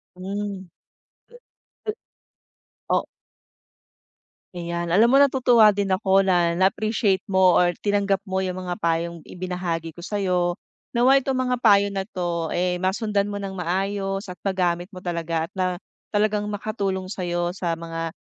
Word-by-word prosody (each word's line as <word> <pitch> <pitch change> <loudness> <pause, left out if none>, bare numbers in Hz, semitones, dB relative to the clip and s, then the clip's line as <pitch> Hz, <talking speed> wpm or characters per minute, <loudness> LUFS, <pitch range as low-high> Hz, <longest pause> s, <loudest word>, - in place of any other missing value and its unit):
Hmm. 195 0 -5 2.2
O - - +2 1.5
Ayan, 170 -1 -3
alam 220 +5 +6
mo 270 - +5
natutuwa 250 -6 +5
din 200 0 -1
ako 190 +1 +3
na 175 -3 +2
na-appreciate 195 +2 +1
mo 190 -2 +4
or 175 0 +3
tinanggap 200 -1 +1
mo 190 -2 -4
'yong 185 -1 -1
mga 180 -1 -3
payong 170 +1 -1
ibinahagi 175 -3 -4
ko 175 - -8
sa 205 0 -2
'yo. 180 -2 +1 0.4
Nawa'y 260 +3 +4
itong 270 - 0
mga 250 -1 0
payo 205 -4 +5
na 195 -1 -3
'to, 175 -5 -3
eh, 180 0 0
masundan 200 +2 0
mo 200 - -4
ng 195 - -4
maayos 195 +2 -2
at 180 - -7
magamit 180 -3 0
mo 185 - -9
talaga 165 -2 -2
at - - -65
na 185 0 -1 0.3
talagang 210 0 +1
makatulong 200 -2 -3
sa'yo 175 -2 -2
sa 175 -2 -2
mga 165 0 -5
190 Hz, 140 wpm, -24 LUFS, 175-205 Hz, 2.2 s, alam